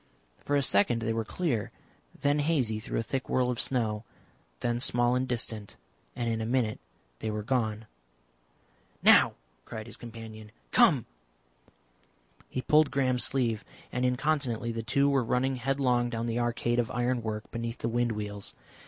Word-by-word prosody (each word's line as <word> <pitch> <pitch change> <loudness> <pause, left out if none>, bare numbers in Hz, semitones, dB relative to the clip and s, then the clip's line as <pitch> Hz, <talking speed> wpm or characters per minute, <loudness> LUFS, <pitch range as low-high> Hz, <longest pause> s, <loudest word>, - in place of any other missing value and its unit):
For 145 - +1
a 140 - +3
second 115 +1 +3
they 115 0 0
were 115 0 -1
clear, 120 - -1 0.5
then 145 +1 +2
hazy 135 -8 +1
through 110 - -4
a - - 0
thick 130 +3 -3
whirl 125 -1 +2
of 120 - -4
snow, 110 -4 -1 0.6
then 120 0 0
small 120 0 +3
and 130 +1 +1
distant, 115 -4 -2 0.4
and 120 -1 -2
in 115 -1 0
a - - -1
minute 120 -3 +1 0.4
they - - -3
were 105 0 -3
gone. 110 -2 0 1.2
"Now!" - - +7 0.3
cried 110 -1 -7
his 115 - -7
companion. 110 -2 -9 0.2
"Come!" - - +5 1.4
He 130 - -3
pulled 155 -1 +5
Graham's 130 -3 +1
sleeve, 115 -5 +1 0.3
and 125 - -1
incontinently 125 -3 0
the 115 0 -3
two 140 +5 +2
were 140 -2 +3
running 130 +3 +1
headlong 125 -1 +1
down 115 -1 -2
the 120 0 -1
arcade 120 0 0
of 120 - 0
iron 125 0 0
work 110 -1 -5
beneath 115 0 -4
the - - -2
wind 120 0 +1
wheels. 105 -1 -6
120 Hz, 160 wpm, -29 LUFS, 110-130 Hz, 1.4 s, Now